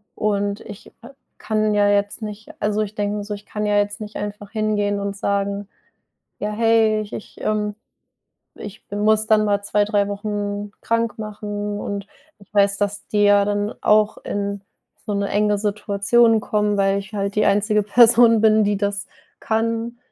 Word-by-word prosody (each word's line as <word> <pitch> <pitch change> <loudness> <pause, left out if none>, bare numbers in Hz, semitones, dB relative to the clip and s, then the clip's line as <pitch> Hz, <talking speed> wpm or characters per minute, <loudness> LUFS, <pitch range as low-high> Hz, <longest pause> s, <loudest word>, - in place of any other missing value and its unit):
Und 205 -1 -1
ich 205 +1 -11
k 240 +4 -12 0.3
kann 215 -1 0
ja 205 0 +4
jetzt 205 +2 0
nicht 215 0 -7
also, 210 +1 0
ich 210 0 -4
denke 205 0 -1
mir 205 - -4
so, 210 - -4
ich 205 - -13
kann 210 0 -4
ja 205 0 +2
jetzt 205 +2 -1
nicht 210 0 -8
einfach 205 0 -6
hingehen 205 -2 0
und 200 0 -3
sagen: 200 0 -1 0.7
„Ja, 210 - -2
hey, 220 -1 +3
ich 210 - -9
ich - - -9
ähm, 210 -1 -1 0.8
ich 210 0 -10
muss 215 +1 +2
dann 215 -1 +4
mal 205 0 0
2, 205 0 +1
3 205 -1 +1
Wochen 205 0 -4
krank 230 -1 -1
machen." 205 -1 -5
Und 200 -1 -4 0.3
ich 200 +1 -21
weiß, 200 -1 +3
dass 205 0 -3
die 205 -1 +1
ja 205 0 +5
dann 205 +1 -1
auch 215 0 +3
in 200 -1 -4 0.4
so 210 - -2
'ne 200 0 -1
enge 210 0 +2
Situation 210 +2 +2
kommen, 210 -1 0
weil 195 0 +2
ich 200 +2 -11
halt 200 0 -2
die 210 - +2
einzige 210 +1 +2
Person 230 +1 +6
bin, 215 -1 +5
die 205 -1 +1
das 200 0 -2 0.3
kann, 230 +1 -1
205 Hz, 175 wpm, -21 LUFS, 205-215 Hz, 0.8 s, Person